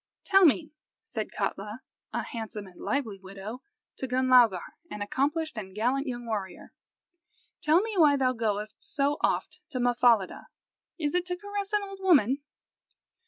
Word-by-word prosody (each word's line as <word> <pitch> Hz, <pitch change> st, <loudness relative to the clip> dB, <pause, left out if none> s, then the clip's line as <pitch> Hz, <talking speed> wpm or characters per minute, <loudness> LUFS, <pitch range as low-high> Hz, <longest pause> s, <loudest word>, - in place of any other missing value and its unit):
"Tell 390 Hz, -1 st, +6 dB
me," 310 Hz, 0 st, +3 dB, 0.3 s
said -, -, -4 dB
Katla, 210 Hz, +5 st, -3 dB, 0.3 s
a -, -, -2 dB
handsome 220 Hz, -2 st, -6 dB
and 180 Hz, -2 st, -14 dB
lively 230 Hz, -8 st, -2 dB
widow, 195 Hz, +5 st, -8 dB, 0.4 s
to 265 Hz, -, -3 dB
Gunlaugar, 250 Hz, -7 st, +4 dB, 0.2 s
an 205 Hz, -, -4 dB
accomplished 290 Hz, +5 st, -1 dB
and 190 Hz, -2 st, -9 dB
gallant 255 Hz, +6 st, 0 dB
young 245 Hz, -1 st, -4 dB
warrior, 205 Hz, -5 st, -5 dB, 0.9 s
"tell 315 Hz, +4 st, +4 dB
me 445 Hz, +1 st, -3 dB
why 295 Hz, -4 st, +6 dB
thou 255 Hz, -1 st, +2 dB
goest 215 Hz, -2 st, -2 dB
so 285 Hz, +1 st, 0 dB
oft -, -, 0 dB
to 255 Hz, -, -3 dB
Mahfahlida? 240 Hz, -4 st, +3 dB, 0.5 s
Is 295 Hz, -4 st, -1 dB
it 360 Hz, 0 st, 0 dB
to 360 Hz, 0 st, -2 dB
caress 405 Hz, +1 st, -4 dB
an 420 Hz, -1 st, +2 dB
old 390 Hz, -1 st, -8 dB
woman?" 280 Hz, -, +4 dB
255 Hz, 150 wpm, -28 LUFS, 215-315 Hz, 0.9 s, Tell